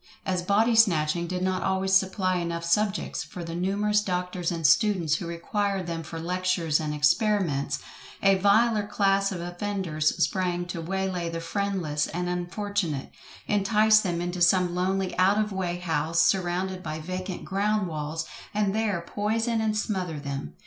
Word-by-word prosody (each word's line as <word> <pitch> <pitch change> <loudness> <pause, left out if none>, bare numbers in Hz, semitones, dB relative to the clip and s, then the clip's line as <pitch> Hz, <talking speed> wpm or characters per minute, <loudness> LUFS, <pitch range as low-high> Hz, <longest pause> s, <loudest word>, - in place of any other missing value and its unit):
As 185 -1 0
body 210 +6 +2
snatching 170 -6 +3
did 180 +1 -3
not 185 0 0
always 190 0 0
supply 190 -1 +2
enough 170 -1 -3
subjects 205 +4 0
for 175 - -8
the 165 0 -6
numerous 205 +4 +1
doctors 180 -2 -2
and 165 -2 -3
students 180 -5 +3
who 170 - -6
required 195 +3 -2
them 165 -1 -4
for 165 +1 -7
lectures 180 -2 0
and 155 -1 -2
experiments, 150 -2 +1 0.5
a 195 0 +6
viler 210 +2 +3
class 195 -1 +2
of 180 -3 -4
offenders 175 -3 -2
sprang 180 -2 0
to 175 -1 -5
way 190 +3 -2
lay 175 -3 -3
the 165 0 -4
friendless 170 -5 -1
and 180 +1 -3
unfortunate, 180 -3 -2 0.3
entice 215 +1 +4
them 175 -5 -2
into 175 0 -3
some 175 0 +4
lonely 185 +1 -1
out 190 +3 +4
of 215 0 0
way 180 -2 -2
house 165 -1 -1
surrounded 185 +1 +1
by 155 -3 -4
vacant 185 +3 -5
ground 205 0 0
walls, 155 0 -4 0.3
and 205 -2 +1
there 210 -5 0
poison 225 +3 -1
and 215 -1 0
smother 185 -7 -2
them. 140 - -5
185 Hz, 160 wpm, -26 LUFS, 170-200 Hz, 0.5 s, a